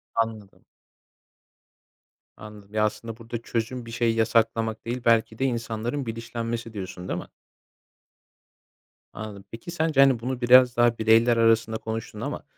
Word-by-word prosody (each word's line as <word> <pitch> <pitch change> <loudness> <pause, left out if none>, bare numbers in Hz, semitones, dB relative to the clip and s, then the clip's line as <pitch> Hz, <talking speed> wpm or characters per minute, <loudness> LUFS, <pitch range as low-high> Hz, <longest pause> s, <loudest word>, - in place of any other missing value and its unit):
Anladım. 110 -3 -3 1.7
Anladım. 105 -1 -12
Ya, 110 0 +2
aslında, 110 +1 -4
burada 115 0 -6
çözüm 115 +2 -3
bir 115 - -9
şey 115 0 +1
yasaklamak 115 0 +1
değil 120 +2 -3
belki 115 -1 +2
de 135 - +1
insanların 120 +2 -2
bilinçlenmesi 115 0 -5
diyorsun 95 -3 -7
değil 85 - -2
mi? - - -9 1.9
Anladım. 100 -2 -8
Peki 115 +9 -8
sence, 160 -4 0
hani, 135 -3 +5
bunu 125 +2 -4
biraz 125 0 +6
daha 120 -1 +4
bireyler 115 +2 +4
arasında 115 -1 +3
konuştun 110 0 -6
ama, - - -4
115 Hz, 135 wpm, -25 LUFS, 110-120 Hz, 1.9 s, biraz